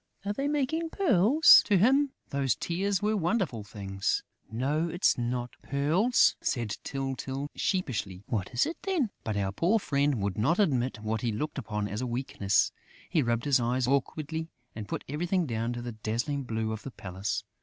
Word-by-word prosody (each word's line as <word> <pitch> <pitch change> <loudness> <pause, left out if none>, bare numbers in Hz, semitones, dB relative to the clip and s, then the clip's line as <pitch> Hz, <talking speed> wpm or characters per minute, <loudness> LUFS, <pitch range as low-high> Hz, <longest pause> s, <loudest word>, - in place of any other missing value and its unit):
Are 205 - 0
they 275 +6 -2
making 300 +3 0
pearls?" 300 - +6
To 205 - +3
him 270 +9 +4 0.2
those 135 -5 +1
tears 190 - -1
were 215 +1 +2
wonderful 175 - 0
things. 100 -2 -2 0.3
"No, 145 +8 0
it's 175 +3 +2
not 120 0 -2
pearls," 165 - +3
said 115 -4 -1
Tyltyl, 135 +1 -4
sheepishly. 105 - -2
"What 105 -2 -2
is 120 0 +2
it 335 - -4
then?" 335 - 0
But 110 -2 -2
our 95 -1 0
poor 175 - +2
friend 140 - +1
would 100 0 -2
not 160 +11 +2
admit 130 - +1
what 110 0 -1
he 120 - 0
looked 145 +7 -3
upon 105 -3 -3
as 105 +4 -4
a 130 - -2
weakness. 120 -5 +1 0.4
He 160 - +3
rubbed 120 -1 0
his 140 -2 +4
eyes 125 +1 +1
awkwardly 155 +4 -1 0.3
and 105 -2 -6
put - - -4
everything 175 +5 0
down 115 -2 -2
to 120 0 -5
the 120 - -4
dazzling 120 +6 -2
blue 110 -1 -2
of 110 -1 -4
the - - -7
palace. 95 -3 -4
135 Hz, 175 wpm, -29 LUFS, 110-175 Hz, 0.4 s, pearls